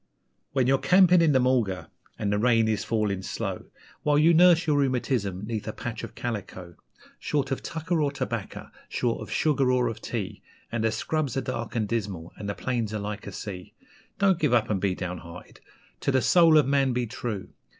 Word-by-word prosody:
When 130 -2 +2
you're 135 +1 +3
camping 180 -1 +5
in 165 -2 +4
the 135 - +4
mulga, 120 -7 0 0.3
and 100 - -1
the 105 - +1
rain 115 -1 +3
is 110 -2 0
falling 105 -4 -1
slow, - - -4 0.4
While 145 -1 +2
you 160 +3 +5
nurse 175 0 +6
your 150 -2 +2
rheumatism 120 -8 -1
'neath 110 -1 -4
a - - -3
patch - - -6
of - - -8
calico; 100 -6 -5 0.5
Short 140 -2 -1
of 135 - -1
tucker 165 0 -2
or 145 -1 +1
tobacco, 140 - -5 0.2
short 120 -2 -1
of - - -8
sugar 140 -4 +2
or 125 -1 +2
of 115 - -7
tea, - - -4 0.3
And 115 -1 -1
the 110 - +2
scrubs 140 +4 -2
are - - +1
dark 120 -3 -5
and 110 -3 0
dismal, 100 -7 -4
and 100 - -6
the 100 - -3
plains 115 -4 -2
are - - -2
like 105 0 -5
a - - -5
sea; 90 -3 -8 0.4
Don't 195 -3 +3
give 145 -6 +3
up 110 -2 +1
and 95 -3 0
be 95 -2 +1
down 90 -1 -4
hearted 85 +1 -12 0.4
to - - 0
the 130 -1 +2
soul 165 -3 +6
of 150 - +5
man 135 -1 +2
be 125 0 0
true! 110 -3 -5
120 Hz, 205 wpm, -26 LUFS, 105-145 Hz, 0.5 s, nurse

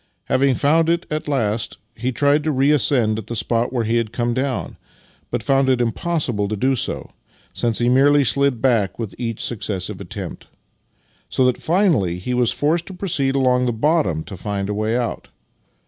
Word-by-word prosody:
Having 135 -1 +2
found 160 +5 +2
it 170 +1 +1
at 155 0 -3
last, 115 -6 -1 0.2
he 125 +1 -2
tried 145 +3 +2
to 155 - 0
reascend 130 -5 +2
at 110 - -9
the 120 - -4
spot 115 +1 0
where 120 -3 0
he 115 +2 +1
had 115 -2 -1
come 120 0 -1
down, 130 +1 -2 0.5
but - - -3
found 135 -1 +2
it 130 -2 +2
impossible 120 -3 0
to 110 - -2
do 130 +6 +1
so, - - -3 0.4
since 115 -2 -1
he 120 - +1
merely 140 +3 +5
slid 135 +1 +1
back 115 -7 +2
with 110 -5 -5
each 115 -2 -3
successive 100 -5 -4
attempt; - - -7 0.8
so 130 - +2
that 125 -1 +2
fmaliy 160 - +1
he 110 +8 -4
was 125 -2 +2
forced 160 +3 0
to 190 - -8
proceed 140 -8 -1
along 125 -2 +2
the - - +1
bottom 110 - +1
to 100 - -9
find 100 +1 -3
a - - -1
way 110 +3 0
out. 120 -3 -3
125 Hz, 185 wpm, -21 LUFS, 110-140 Hz, 0.8 s, merely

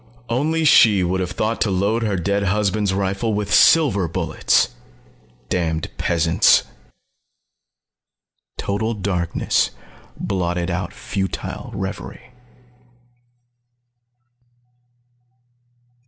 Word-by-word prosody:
Only 155 +7 0
she 105 -9 +6
would 90 +2 -1
have 90 -2 -2
thought 110 +5 -2
to 105 - +2
load 100 +5 0
her 105 -3 -1
dead 100 +3 0
husband's 100 0 0
rifle 100 +3 -1
with 105 0 -2
silver 125 - +5
bullets! 80 - +1 0.8
Damned 80 -3 -2
peasants 85 0 +3 1.0
" - - -59 0.9
Total 110 +3 -2
darkness 90 -4 0 0.5
blotted 90 -2 -2
out 90 +1 -3
futile 95 -1 -5
revery. 125 - -7
100 Hz, 85 wpm, -20 LUFS, 90-110 Hz, 1.0 s, she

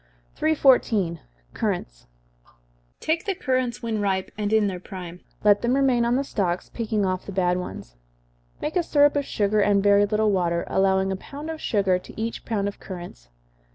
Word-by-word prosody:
314. 245 - +3 0.3
Currants. - - -3 0.9
Take 330 +5 -1
the 395 -2 -1
currants 255 -5 -1
when 220 -2 -1
ripe 190 -2 -1
and 210 0 -2
in 220 -1 +4
their 190 -3 -2
prime 180 -2 -8 0.2
let 205 -1 +5
them 240 +2 +1
remain 260 -4 +3
on 240 +1 +2
the 275 - +1
stalks, 185 -9 -2
picking 215 -3 -1
off 185 -1 -2
the - - -5
bad 180 -2 +1
ones. - - -7 0.6
Make 305 - -4
a 360 - +4
syrup 290 -3 +3
of 285 -1 0
sugar, 210 -2 +1
and 200 -1 +3
very 205 0 +5
little 215 0 +2
water, 170 -3 0
allowing 190 0 +2
a - - -1
pound 290 +10 -7
of 315 - -7
sugar 195 -4 +1
to 185 - -12
each 230 +1 -4
pound 205 -3 -1
of 200 - -6
currants. 175 - -9
205 Hz, 180 wpm, -24 LUFS, 185-245 Hz, 0.9 s, let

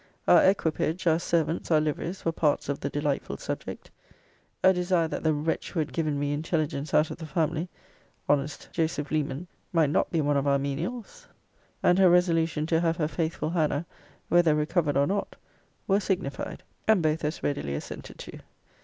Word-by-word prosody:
Our - - +7
equipage, 170 -2 +1
our 165 -1 +4
servants, 165 -1 0
our 160 -2 +5
liveries, 155 +4 -3
were 165 - +2
parts 150 -3 0
of 140 - -1
the - - -3
delightful 145 -1 -2
subject. - - -6 0.7
A 190 - +7
desire 180 -2 +1
that - - -4
the 160 - +2
wretch 155 +2 -2
who 175 - -3
had 155 - -2
given 155 -3 0
me 145 0 0
intelligence 155 -1 -2
out 155 +1 +3
of - - -6
the 160 -2 -7
family 165 +1 -1 0.6
(honest 145 +1 0
Joseph 160 -3 -1
Leman) 150 +1 -1 0.3
might 160 -4 +3
not - - +1
be 165 - 0
one 145 -1 +2
of 140 +1 0
our 140 0 +4
menials; 185 - -4 0.6
and 180 +1 +4
her 190 -2 +7
resolution 165 -3 +2
to 165 0 +2
have 165 -1 +1
her 155 -4 +1
faithful 160 -1 -2
Hannah, 160 -2 0 0.4
whether 170 -3 +4
recovered 150 -1 +1
or 140 - +4
not; 200 +6 -2 0.5
were 195 0 +3
signified; 180 -9 -3 0.2
and 215 -6 +4
both 155 +1 +1
as 150 +2 -3
readily 70 - -1
assented - - -7
to. - - -9
160 Hz, 180 wpm, -27 LUFS, 150-175 Hz, 0.7 s, Our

